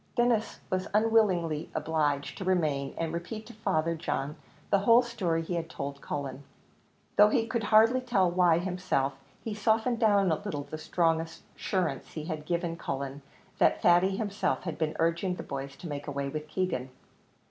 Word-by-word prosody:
Denis 240 -2 +1
was 185 0 0
unwillingly 195 -8 +2
obliged 150 -3 0
to - - -3
remain, 155 -7 0
and 165 -1 -2
repeat 195 +6 -5
to - - -11
Father 170 -6 0
John 150 -3 -3 0.4
the 200 - +5
whole 230 +5 +6
story 180 -9 -1
he 170 - -4
had 165 -1 -2
told 140 -2 -6
Cullen. 140 -1 -5 0.7
Though 210 0 +8
he 225 +1 +2
could 230 -2 -2
hardly 225 +4 +5
tell 240 -7 +2
why 175 -2 +4
himself, 180 -6 -1 0.3
he 225 - -3
softened 220 +3 +1
down 200 -5 +4
a - - +3
little 150 -9 -3
the 155 - -7
strong 165 0 +1
assurance 165 -1 -4
he 155 - -5
had 155 -2 -5
given 170 -1 -1
Cullen 140 -1 -4 0.4
that - - +4
Thady 180 +3 +4
himself 205 -2 -1
had 165 -4 -5
been 155 -1 -1
urging 170 +3 +1
the - - -7
boys 135 0 -6
to 175 - -9
make 145 -1 -5
away 140 -1 -2
with 155 +2 -5
Keegan. 155 -7 -2
170 Hz, 170 wpm, -29 LUFS, 150-205 Hz, 0.7 s, Though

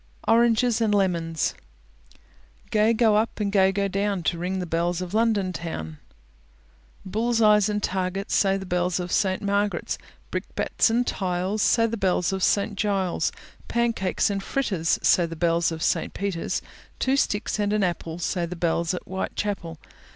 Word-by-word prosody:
ORANGES 235 +1 +3
AND 215 -2 +2
LEMONS 170 -5 0 1.2
Gay 215 0 +4
go 220 -2 +3
up, 225 +1 -1
and 205 -1 0
gay 190 -1 +4
go 200 +1 0
down 195 -1 -1
To 165 +1 0
ring 185 +2 -2
the 180 - -2
bells 170 +1 -1
of 180 0 -5
London 215 -4 +1
Town. 80 - -6 1.1
Bull's 225 +4 0
eyes 210 -2 +5
and 210 0 -2
targets 190 +1 -2
Say 195 -1 +3
the 190 - -6
bells 180 -1 0
of 180 0 -4
St. 190 0 +1
Marg'ret's. 200 0 -1 0.3
Brickbats - - 0
and 240 +2 +1
tiles, 185 +2 -1
Say 230 +2 +4
the 230 0 -2
bells 185 -2 +1
of 190 - -2
St. 205 +2 +1
Giles'. 195 -3 0 0.4
Pancakes 230 -4 0
and 195 -1 -2
fritters, 195 -9 0
Say 175 -2 +4
the 165 - -7
bells 170 0 +1
of 160 -1 -4
St. - - 0
Peter's. 195 -4 -2 0.3
Two 265 +1 +1
sticks 210 -5 0
and 205 0 +1
an 210 -1 +1
apple, 170 -2 -2
Say 175 0 -1
the 180 - -6
bells 170 0 0
at - - -6
Whitechapel. 190 -2 -4
195 Hz, 165 wpm, -25 LUFS, 175-210 Hz, 1.2 s, eyes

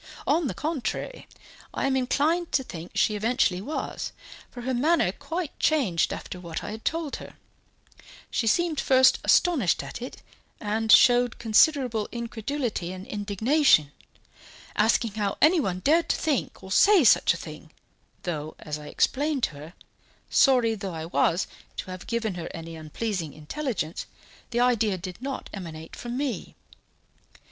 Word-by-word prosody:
On 315 +1 +2
the - - -4
contrary, 310 - -4 0.5
I - - 0
am 270 -1 +1
inclined 300 +7 +1
to 280 -3 +2
think 170 -7 -9
she 215 +1 +2
eventually 210 -4 +1
was, 290 +9 -4 0.4
for 245 - -9
her 260 +2 -2
manner 290 - +2
quite 315 - -5
changed 245 - +2
after 180 - -6
what 170 -3 -6
I - - -5
had 220 +1 -8
told 325 -3 -2
her; - - -11 1.0
she 230 - 0
seemed 325 +5 +2
first 260 -1 +5
astonished 285 - +3
at - - -8
it, 250 - -8 0.4
and 220 +1 0
showed 245 -1 +6
considerable 235 -1 +3
incredulity 235 -4 -3
and 185 +1 -8
indignation, 210 - +2 0.8
asking 225 +1 +2
how 205 -1 -2
anyone 285 - +3
dared 325 - +3
to - - +2
think 300 -5 -2
or 190 - -9
say 395 - +6
such 210 - +5
a - - -6
thing, 155 -1 -10 0.5
though, 155 -3 -4
as 150 0 -6
I 150 - -10
explained 285 - 0
to - - +2
her, 150 +3 -11 0.6
sorry 250 -4 +4
though 195 -5 -5
I 160 0 -5
was 170 +1 +1 0.3
to 185 - -5
have 185 -1 -8
given 230 -3 -1
her 170 -2 -6
any 165 0 -7
unpleasing 160 +1 -4
intelligence, 170 - -4 0.4
the 240 0 0
idea 225 -5 +2
did 185 +3 -8
not 270 0 -4
emanate 160 -5 -8
from 240 +1 -5
me. 275 -3 -3
225 Hz, 150 wpm, -26 LUFS, 185-275 Hz, 1.0 s, showed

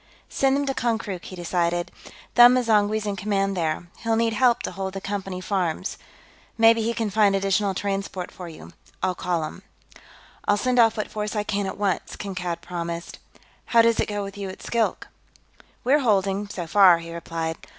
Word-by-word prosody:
"Send 270 0 +2
them 285 0 0
to 270 - -1
Konkrook," 220 -8 -2
he 185 - -8
decided. 175 0 -1 0.4
"Them 240 +1 +8
M'zangwe's 215 -3 +2
in 205 -1 -2
command, 195 0 0
there; 165 -1 -1
he'll 225 -1 0
need 230 0 +1
help 240 +1 +3
to - - -3
hold 190 +1 -4
the - - -2
Company 195 -2 -4
farms. 185 -2 -2 0.6
Maybe 225 0 +6
he 225 +1 0
can 220 -3 -1
find 205 -1 +4
additional 195 0 +1
transport 195 -2 -3
for 180 -2 -9
you. 160 - -12 0.3
I'll 185 -1 +2
call 175 -2 -1
him." 155 +4 -7 0.9
"I'll 205 - +4
send 250 +3 +1
off 225 -1 +5
what 215 - -3
force 210 0 -3
I 210 - 0
can, 205 -1 -1
at - - -5
once," 200 -3 -1
Kankad 180 -4 -4
promised. 170 -1 -5 0.5
"How 230 -1 +5
does 230 0 +3
it - - +1
go 205 -1 -3
with 200 +1 -8
you 195 -1 -4
at 190 - -10
Skilk?" 230 -2 -1 0.8
"We're 280 +4 +4
holding, 200 -4 +1
so 180 -4 -5
far," 180 0 +6
he 165 0 -8
replied. 165 -1 -4
200 Hz, 185 wpm, -24 LUFS, 180-220 Hz, 0.9 s, Them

